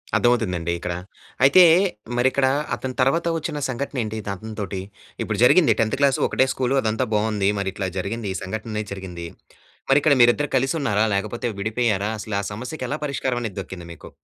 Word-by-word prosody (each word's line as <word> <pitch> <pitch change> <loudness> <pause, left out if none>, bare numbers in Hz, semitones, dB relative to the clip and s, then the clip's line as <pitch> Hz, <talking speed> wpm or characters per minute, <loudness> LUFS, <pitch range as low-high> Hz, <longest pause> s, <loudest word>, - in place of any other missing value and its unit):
అర్ధమవుతుందండి 95 -9 +1
ఇక్కడ. 90 0 -3 0.5
అయితే, 140 +7 +8 0.5
మరిక్కడా 130 +1 +3 0.2
అతని 130 -1 -5
తర్వాత 165 +7 +2
ఒచ్చిన 155 -1 -4
సంఘటనేంటి 125 -4 -3
ఇదతనితోటి. 100 -1 -5 0.4
ఇప్పుడు - - -3
జరిగింది - - +6
10థ్ 110 0 0
క్లాసు 140 -2 +3
ఒకటే 130 - +2
స్కూలు 130 +1 0
అదంతా 110 +3 0
బావుంది. 105 -2 +1
మరి 100 -1 -1
ఇట్లా 95 -1 -3
జరిగింది, 105 +3 -3
ఈ 95 - -3
సంఘటనేది 105 +1 -4
జరిగింది. 90 -3 -7 0.6
మరిక్కడ 145 +2 +5
మీరిద్దరు 120 +5 +4
కలిసి 135 +3 +1
ఉన్నారా, 105 -4 +2
లేకపోతే 110 +5 -2
విడిపోయారా? 105 -1 0
అసలు 105 -1 -3
ఆ - - -8
సమస్యకి 125 +8 -5
ఎలా 150 - -2
పరిష్కారమనేది 120 -7 -2
దక్కింది 90 -2 -9
మీకు? 75 - -13
110 Hz, 150 wpm, -23 LUFS, 100-130 Hz, 0.6 s, అయితే